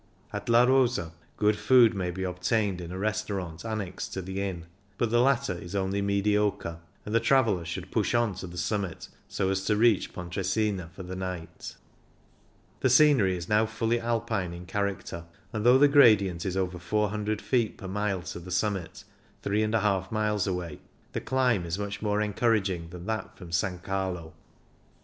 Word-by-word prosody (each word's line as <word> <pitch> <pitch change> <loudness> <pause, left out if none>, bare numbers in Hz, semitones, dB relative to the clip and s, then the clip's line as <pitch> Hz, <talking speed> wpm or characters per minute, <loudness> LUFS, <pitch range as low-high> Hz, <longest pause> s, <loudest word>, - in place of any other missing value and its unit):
At - - -5
La 115 +1 +6
Rosa 125 -9 +2 0.3
good 105 0 +3
food 125 -4 +6
may 95 -3 -2
be 95 +2 -4
obtained 90 +1 0
in 85 0 -7
a 90 - -5
restaurant 100 -5 -3
annexed 105 -3 -4
to 95 - -3
the 95 +2 -4
inn, 90 -4 -4 0.3
but 115 -2 0
the 120 0 +4
latter 135 -2 +2
is 85 +2 -8
only 100 +1 0
mediocre, 100 -4 0 0.3
and 105 - -5
the 115 - +5
traveller 115 -7 +3
should 90 +3 -6
push 110 +1 +1
on 120 -3 +2
to 95 +1 -7
the 90 0 -10
summit, 95 -1 -3 0.2
so 95 0 -1
as 95 0 -1
to 105 - +2
reach 110 -2 +3
Pontresina 95 +1 -2
for 95 - -7
the 90 +1 -6
night 90 -3 -6 1.0
The 130 - +2
scenery 130 -9 +5
is 85 0 -6
now 110 +1 +3
fully 115 +1 0
Alpiiie 115 -6 -1
in 90 +1 -9
character, 95 -2 -3 0.3
and 110 -2 -2
though 125 +2 +7
the 145 +2 +6
gradient 105 - +5
is 95 0 -2
over 90 -1 -1
400 105 +2 -1
feet 120 -3 0
per 95 - -8
mile 100 -1 -1
to 90 0 -6
the 90 +1 -10
summit, 95 0 -2 0.4
3^^ 105 -2 +1
miles 105 -2 0
away, 90 -4 -3 0.3
the - - -2
climb 125 -7 +1
is 85 +1 -3
much 100 0 -4
more 105 0 +1
encouraging 105 -5 0
than 90 +1 -9
that 110 -2 -4
from 90 -3 -10
S. 85 -1 +1 0.2
Carlo. 95 -3 -3
100 Hz, 175 wpm, -28 LUFS, 90-110 Hz, 1.0 s, though